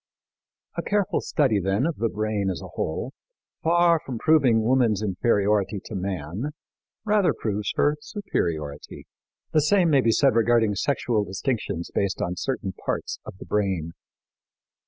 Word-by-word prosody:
A - - 0
careful 205 -2 0
study, 130 -9 +1
then, 95 +7 0
of 165 -1 -1
the 115 - 0
brain 105 -2 -1
as 90 - -3
a - - -9
whole, 120 - -3 0.5
far 170 0 +4
from 130 -6 -5
proving 130 -6 +4
woman's 115 -3 +2
inferiority 100 0 +1
to - - -8
man, 95 - -3 0.6
rather 210 -3 +3
proves 105 -1 -2
her 150 +1 +2
superiority. 80 - -4 0.5
The 155 - +4
same 175 +2 +3
may 140 -2 +5
be 115 - +2
said 135 +3 +4
regarding 115 -1 +3
sexual 115 -1 0
distinctions 95 - -3
based 100 -2 0
on 90 +1 -2
certain 110 -2 -3
parts - - -3
of - - -9
the - - -10
brain. 95 -6 -1
110 Hz, 145 wpm, -25 LUFS, 95-140 Hz, 0.6 s, may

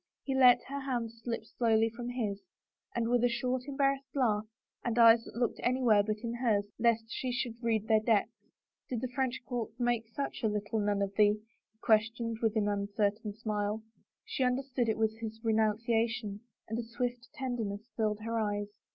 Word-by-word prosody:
He 270 - -2
let 255 -2 +6
her 280 +1 -5
hands 235 -4 -3
slip 230 -2 -3
slowly 225 -1 +2
from 240 +2 -5
his 215 -5 -2 0.5
and 235 -1 +1
with 240 0 +2
a 245 - +5
short, 250 +2 -1
embarrassed 275 -1 0
laugh, 215 -5 +1 0.4
and 235 -1 -1
eyes 230 -1 +7
that - - -11
looked 240 0 0
anywhere 245 -4 +4
but 215 +1 -1
in 235 0 -2
hers 225 -4 +1
lest 230 -1 +3
she 255 +2 -3
should 240 -2 -3
read 220 -2 0
their 220 -1 +5
depths, 220 -1 0 0.2
" - - -59
Did 240 -3 -2
the 255 - -2
French 260 -2 -1
court 240 -4 -3
make 240 -2 +1
such 245 +3 -4
a 225 - +2
little 210 +1 -1
nun 205 -1 +1
of 200 0 -3
thee?" 210 0 +4
he 220 -1 -40
questioned 225 +1 +2
with 225 -1 +1
an 215 -2 +2
imcertain 205 +1 -1
smile. 215 -1 -2 0.4
She 265 - -1
understood 250 -1 0
it 220 - +1
was 220 0 0
his 220 -1 -6
renunciation 225 -1 +1 0.3
and 225 +2 -3
a - - -2
swift 245 +1 -3
tenderness 235 -5 -4
filled 215 -1 0
her 230 +1 -1
eyes. 205 -1 -1
230 Hz, 185 wpm, -31 LUFS, 215-245 Hz, 0.5 s, eyes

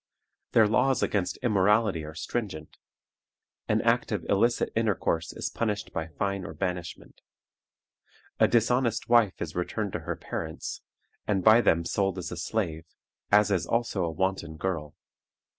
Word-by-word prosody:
Their 110 -2 +6
laws 125 +4 +2
against 95 -3 0
immorality 105 -5 +3
are 80 +1 -9
stringent. 90 -5 -5 0.9
An - - +2
act - - +2
of - - -2
illicit 115 +4 +2
intercourse 100 -7 0
is - - -4
punished 105 -3 -2
by 80 -1 -3
fine 100 +5 -3
or 80 - -7
banishment. 90 0 -5 1.2
A - - +6
dishonest 120 0 +1
wife 115 -5 +4
is 80 -2 -5
returned 100 +3 -2
to - - -2
her - - -4
parents, - - -5 0.5
and 95 -3 +1
by 110 +2 +7
them 85 -6 +2
sold 95 +1 0
as 90 - -5
a 90 - -5
slave, 85 -3 -2 0.4
as 105 0 +5
is 95 -3 0
also 115 -5 0
a 85 - 0
wanton 85 -1 -2
girl. 80 -5 -3
95 Hz, 145 wpm, -27 LUFS, 85-110 Hz, 1.2 s, by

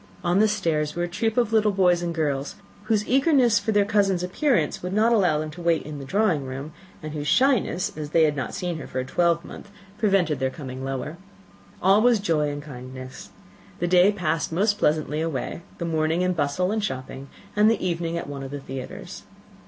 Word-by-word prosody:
On 175 +2 +2
the 215 - +5
stairs 165 -8 -1
were 175 - -1
a - - -1
troop 220 +6 -2
of 235 -2 +2
little 215 -1 +4
boys 180 -3 +3
and 175 -1 -2
girls, 145 -4 -2 0.3
whose 215 -1 +1
eagerness 260 -4 +4
for 220 - -2
their 205 -1 +3
cousin's 200 -4 +1
appearance 185 - 0
would 180 +1 -4
not 220 +3 +3
allow 180 -8 +3
them 155 0 -3
to 175 +3 -10
wait 170 -1 +1
in 150 -1 -7
the 135 - -7
drawing 185 -2 +1
room, 135 +3 -6 0.3
and 155 -1 -5
whose 150 -1 -4
shyness, 245 - +2
as 150 -1 -5
they 160 +1 +4
had 150 -2 +2
not 135 - -4
seen 175 -3 -3
her 140 - -8
for - - -7
a 130 - -2
twelvemonth, 170 +6 -1 0.3
prevented 195 - +2
their 130 0 +1
coming 130 -2 -7
lower. 135 +4 -4 0.7
All 195 +3 +5
was 240 0 +5
joy 160 -7 0
and 145 0 -5
kindness. 130 -2 -9 0.5
The 175 - -1
day 180 +3 +5
passed 165 -6 -1
most 205 +5 +1
pleasantly 150 0 +1
away; 160 0 -3 0.2
the 170 - -3
morning 160 +1 0
in 185 0 +1
bustle 165 +4 0
and 215 -1 -1
shopping, 130 -4 -5 0.3
and 210 +1 +5
the 225 -4 0
evening 170 -1 -2
at - - -4
one 140 -1 -6
of 135 - -6
the 145 +1 -5
theatres. 135 -1 -8
170 Hz, 205 wpm, -24 LUFS, 150-205 Hz, 0.7 s, the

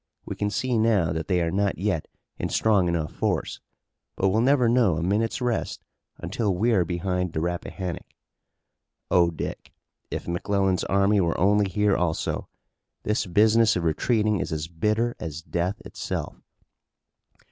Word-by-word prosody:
We - - -5
can 105 - -1
see 125 +2 0
now 105 -8 +2
that 80 0 -4
they 90 -2 +2
are 85 - -1
not 100 0 0
yet 95 -4 -1 0.3
in - - -2
strong 100 -5 +2
enough 85 -3 -1
force, - - -2 0.6
but 95 - +2
we'll 110 +4 +2
never 130 -1 +4
know 115 -7 +3
a 85 - -2
minute's 105 +7 0
rest 120 -2 -2 0.3
until 105 -5 -1
we're 110 -1 +2
behind 90 0 -2
the - - -1
Rappahannock. 90 +1 -4 1.0
Oh, 85 -1 +5
Dick, 80 - -6 0.4
if - - -5
McClellan's 95 +2 0
army 100 +1 +3
were 85 -2 0
only 100 +2 +3
here 105 +1 +2
also! 85 -2 -1 0.6
This 105 0 0
business 110 +4 +4
of 90 - -1
retreating 105 +5 +1
is - - -3
as 80 0 -3
bitter 105 +8 0
as 80 0 -6
death 90 +5 -2
itself!" - - -5
95 Hz, 150 wpm, -25 LUFS, 85-110 Hz, 1.0 s, Oh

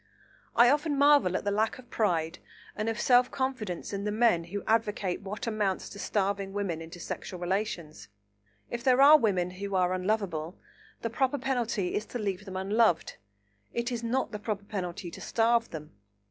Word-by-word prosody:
I 240 +2 +7
often 295 0 +1
marvel 285 -11 +5
at - - -5
the 205 - +1
lack 215 +2 0
of 250 -2 -15
pride 165 -7 0 0.4
and 215 +2 -1
of 225 - -3
self 250 0 +4
confidence 240 -10 -3
in 200 0 -3
the 210 - -1
men 215 -6 +3
who 200 +4 -5
advocate 210 -4 0
what 200 +1 -5
amounts 210 -4 -1
to 200 - -10
starving 200 -1 -1
women 195 -5 -2
into 165 +2 -9
sexual 180 +1 -6
relations. 175 - -3 0.6
If 235 0 -4
there 255 -1 +4
are 295 +2 +10
women 185 -6 +1
who 200 +2 -5
are 180 -1 +2
unlovable, 185 -3 -2 0.5
the 230 - -2
proper 265 +3 +1
penalty 240 -8 -1
is 210 - -2
to - - -5
leave 200 -3 -3
them 190 -1 -6
unloved; 200 -1 +1 0.6
it 235 +1 -1
is 235 -1 -3
not 250 +3 -1
the 210 - -5
proper 210 -1 -3
penalty 180 -3 -5
to - - -10
starve 230 0 +2
them. 150 -2 -8
205 Hz, 180 wpm, -29 LUFS, 185-235 Hz, 0.6 s, are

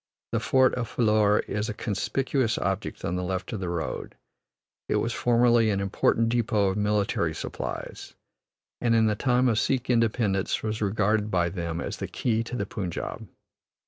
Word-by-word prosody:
The - - +1
fort 130 -1 +3
of 120 -3 -3
Phillour 105 -2 +2
is 105 +1 -2
a 105 - -4
conspicuous 120 +3 -1
object - - -3
on 90 - -1
the 90 - -2
left 95 +4 -3
of 110 - -3
the 90 -2 -3
road; 85 -2 -4 0.7
it - - +1
was 115 - 0
formerly 120 -1 +3
an 100 -2 +1
important 100 +3 +1
depot 110 -4 +2
of 95 - -2
military 105 -6 0
supplies, - - -6 0.7
and 115 -1 +3
in 110 -1 +4
the 110 - +2
time 125 +2 +2
of 110 -3 +2
Sikh 130 -1 0
independence 110 -4 +1
was 110 0 -2
regarded 105 +1 +1
by 90 -3 +1
them 85 -2 -4
as - - -4
the - - -4
key 115 -2 0
to 125 - -5
the 100 - -2
Punjab. 95 -4 -5
110 Hz, 175 wpm, -26 LUFS, 100-120 Hz, 0.7 s, in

